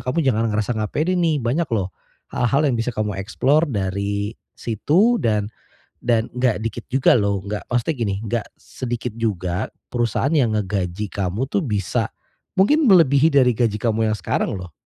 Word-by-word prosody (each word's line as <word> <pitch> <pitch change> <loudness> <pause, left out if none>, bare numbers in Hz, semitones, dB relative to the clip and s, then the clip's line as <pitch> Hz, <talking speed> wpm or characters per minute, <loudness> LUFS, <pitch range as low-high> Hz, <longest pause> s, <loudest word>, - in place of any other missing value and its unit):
kamu 130 +6 0
jangan 115 -2 +2
ngerasa 110 +2 -1
gak 105 -1 -2
pede, 175 +5 +1
nih, 160 -5 +1
banyak 145 +8 0
loh 95 -4 -1 0.4
hal-hal 135 +5 +1
yang 120 - +1
bisa 115 +2 -1
kamu 105 -2 -2
explore 135 +10 +2
dari 100 0 -2 0.2
situ 170 - +2
dan 105 -2 +1 0.6
dan 115 -2 +2
gak 125 -4 +2
dikit 115 +1 -4
juga 135 -2 +4
loh 100 -2 0
gak 105 +1 -4
maksudnya 125 +6 +1
gini, 100 -4 0
gak 115 -1 -1 0.2
sedikit 120 -2 -5
juga 95 -6 -2 0.2
perusahaan 120 +4 0
yang 120 -6 +3
ngegaji 95 0 -2
kamu 100 +6 -2
tuh 195 - +1
bisa 105 -6 -1 0.5
mungkin 295 +11 +4
melebihi 160 -5 +5
dari 130 -3 +5
gaji 115 -3 +1
kamu 110 -1 +1
yang - - -1
sekarang 90 - -1
loh. 90 -3 -9
115 Hz, 165 wpm, -21 LUFS, 105-135 Hz, 0.6 s, melebihi